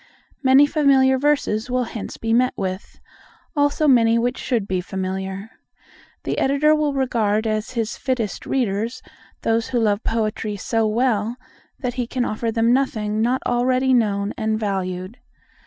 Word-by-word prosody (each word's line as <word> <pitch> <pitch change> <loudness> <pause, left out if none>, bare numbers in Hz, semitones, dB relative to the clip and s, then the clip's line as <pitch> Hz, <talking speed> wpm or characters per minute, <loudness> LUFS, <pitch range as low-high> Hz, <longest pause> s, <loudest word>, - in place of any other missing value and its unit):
Many 270 +1 +6
familiar 275 -3 +3
verses 275 -6 0
will 250 0 +1
hence 225 -3 -7
be 225 0 -1
met 250 +2 +2
with; 190 -1 -5 0.6
many 290 - +3
also 290 +2 +1
which 235 -1 +3
should 230 -6 -1
be 185 -2 -1
familiar. 190 +2 -5 0.7
The - - -2
Editor 280 +3 +3
will 300 -2 0
regard 225 -5 0
as 215 +2 -2
his 230 -2 -2
fittest 245 -7 -3
readers 230 -2 -1 0.4
those 225 0 +1
who 250 -2 0
love 210 -1 +1
poetry 215 -1 -2
so 225 +3 0
well, 225 0 0 0.4
that 250 -2 -3
he 240 - -3
can 245 0 -1
offer 225 +1 -2
them 230 +1 +2
nothing 215 -5 0
not 245 +3 +1
already 255 +2 +2
known 205 -4 +1
and 220 0 0
valued. 190 +1 -3
230 Hz, 150 wpm, -21 LUFS, 210-260 Hz, 0.7 s, Many